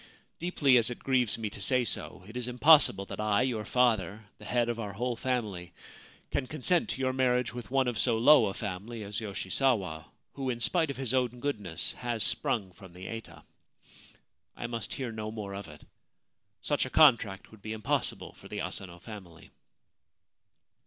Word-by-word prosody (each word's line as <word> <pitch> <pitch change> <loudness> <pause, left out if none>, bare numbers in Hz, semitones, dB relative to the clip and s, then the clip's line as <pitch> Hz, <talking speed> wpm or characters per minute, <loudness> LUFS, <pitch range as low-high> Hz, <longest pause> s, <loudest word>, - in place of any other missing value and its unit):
Deeply 150 -7 +3
as 115 -1 +4
it 125 - -5
grieves 125 -5 +1
me 110 -1 -3
to 100 - -8
say 125 +5 +2
so, 95 - -2
it 110 - -12
is 125 -1 -3
impossible 125 -5 +5
that - - -8
I, 105 +2 +2
your 120 -5 -1
father, 110 -4 +1
the 105 - -11
head 120 +1 +1
of 120 -1 -2
our 105 -3 -4
whole 120 +4 -2
family, 105 -8 -3 0.6
can 130 - -1
consent 155 +5 +1
to 135 - -3
your 130 0 +1
marriage 125 -3 +1
with 120 -1 -7
one 135 0 +2
of 120 -3 -2
so 115 - +3
low 125 0 +6
a 95 - -4
family 105 +3 -5
as 100 0 -4
Yoshisawa, 100 - -1 0.3
who, 135 -2 -3
in 120 -2 -2
spite 160 +5 +1
of 140 - -4
his 130 -2 -2
own 125 -2 0
goodness, 105 - -2
has 120 -3 -1
sprung 100 -5 +1
from 90 0 -14
the 90 +1 -9
eta. 85 -9 -8 1.1
I - - -5
must 115 -2 -4
hear 130 -4 -4
no 110 -1 -5
more 105 -3 -6
of 100 +1 -6
it. 75 -1 -13 0.8
Such - - +1
a - - -7
contract 115 -10 +4
would 110 -2 -16
be 110 - -6
impossible 110 -1 -1
for - - -14
the - - -5
Asano 90 -2 -6
family.' 90 -5 -12
115 Hz, 185 wpm, -30 LUFS, 100-125 Hz, 1.1 s, low